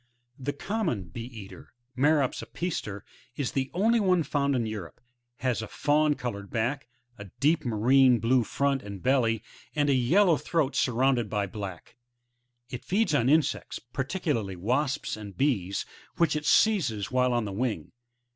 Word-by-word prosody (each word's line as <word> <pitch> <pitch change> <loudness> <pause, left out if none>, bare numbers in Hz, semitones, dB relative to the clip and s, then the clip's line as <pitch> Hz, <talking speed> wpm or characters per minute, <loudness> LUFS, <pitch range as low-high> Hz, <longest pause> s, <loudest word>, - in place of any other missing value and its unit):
The 135 +2 -2
Com 210 +8 -2
mon 105 - -1
Bee 115 +8 -7
eater, 110 -6 -11
— 125 +1 -49
Merops 145 0 +2
a/>ia«/er,~ 105 - -4 0.5
the 135 -1 -1
only 225 +6 +2
one 185 -5 +3
found 140 -2 0
in 120 -3 0
Europe, 105 -8 -6 0.4
has 125 -3 0
a 110 - -5
fawn 150 +3 +2
coloured 100 -7 -5
back, 120 +4 -2 0.3
a 105 - -7
deep 155 +3 +3
marine 125 +2 +4
blue 120 +3 +2
front 140 +3 0
and 100 -2 -9
belly, 120 -4 +2 0.3
and 145 -1 +2
a - - +4
yellow 165 +8 +4
throat 150 -4 -1
surrounded 125 -2 +2
by 105 -2 0
black; 100 -1 -8 0.7
it 125 - -6
feeds 205 -2 +1
on 130 -3 +3
insects, 155 +1 +1
particu 150 +4 -1
larly 100 -6 -3
wasps 130 +9 -1
and 105 -2 -10
bees, 105 -9 0 0.3
which 170 -2 +2
it 150 -1 -2
seizes 140 - +2
while 125 0 +2
on 120 -2 0
the 100 - -5
wing. 115 +2 -2
130 Hz, 160 wpm, -27 LUFS, 110-150 Hz, 0.7 s, marine